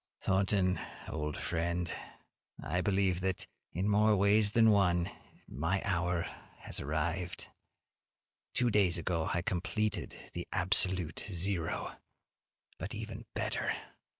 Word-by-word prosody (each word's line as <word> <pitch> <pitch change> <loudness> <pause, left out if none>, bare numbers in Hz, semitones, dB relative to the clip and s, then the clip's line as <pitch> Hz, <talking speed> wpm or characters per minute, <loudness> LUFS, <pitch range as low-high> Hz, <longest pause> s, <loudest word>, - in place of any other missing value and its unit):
Thornton, 95 -1 +2 0.3
old 75 -1 -3
friend, 85 0 -1 0.7
I 90 +4 -1
believe 95 -1 +2
that, 95 -1 0 0.3
in 95 +4 -1
more 105 +1 +5
ways 105 +1 +4
than 110 -1 +6
one, 90 -4 +3 0.4
my 80 +9 0
hour 90 -3 +1 0.4
has - - -1
arrived. 80 +4 -2 1.0
Two 120 -2 +3
days 100 -5 +4
ago 85 -1 -1
I 85 - 0
completed 105 +2 -1 0.2
the - - -5
absolute 90 -3 +2
zero. 90 -2 0 0.8
But - - -4
even - - -6
better! - - 0
90 Hz, 110 wpm, -33 LUFS, 85-100 Hz, 1.0 s, than